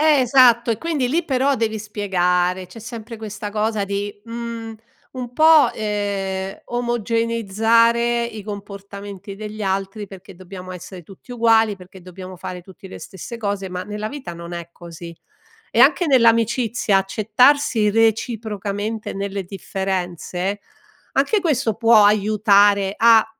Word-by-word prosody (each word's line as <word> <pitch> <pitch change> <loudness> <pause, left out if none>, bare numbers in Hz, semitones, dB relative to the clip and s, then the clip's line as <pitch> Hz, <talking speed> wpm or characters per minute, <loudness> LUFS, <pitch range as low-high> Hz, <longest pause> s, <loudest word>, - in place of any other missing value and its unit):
Eh 305 -3 +5
esatto 245 -2 +5
e 220 - -1
quindi 315 -5 -1
lì 325 +5 0
però 275 0 +1
devi 220 -2 -1
spiegare, 185 -3 0
c'è 180 +5 -13
sempre 230 0 -8
questa 215 -1 -6
cosa 215 0 -1
di, 205 +1 -4
mhmm, 230 -1 -6 0.4
un 250 -2 -6
po', 315 0 +6
ehm, 200 -2 -3
omogeneizzare 230 0 +1
i 220 -3 -7
comportamenti 200 -1 -8
degli 215 +1 -8
altri 195 +1 -2
perché 195 0 -13
dobbiamo 185 0 -10
essere 180 +1 -9
tutti 195 +8 -16
uguali, 225 -3 +3
perché 185 0 -14
dobbiamo 185 +1 -10
fare 180 0 -7
tutti 190 +1 -14
le - - -9
stesse 195 +5 -9
cose, 200 -3 -3
ma 180 0 -5
nella 210 +2 -5
vita 275 -10 -7
non 170 +1 -9
è 170 -1 -7
così 170 0 -10 0.6
e 230 - +1
anche 280 +7 +5
nell'amicizia 230 -4 +3
accettarsi 220 +3 +2
reciprocamente 220 -1 -1
nelle 195 0 -3
differenze, 190 0 -4 0.5
anche 430 - +2
questo 275 - 0
può 225 -2 +5
aiutare 205 -1 +3
a 225 -1 +6
210 Hz, 135 wpm, -21 LUFS, 195-230 Hz, 0.6 s, po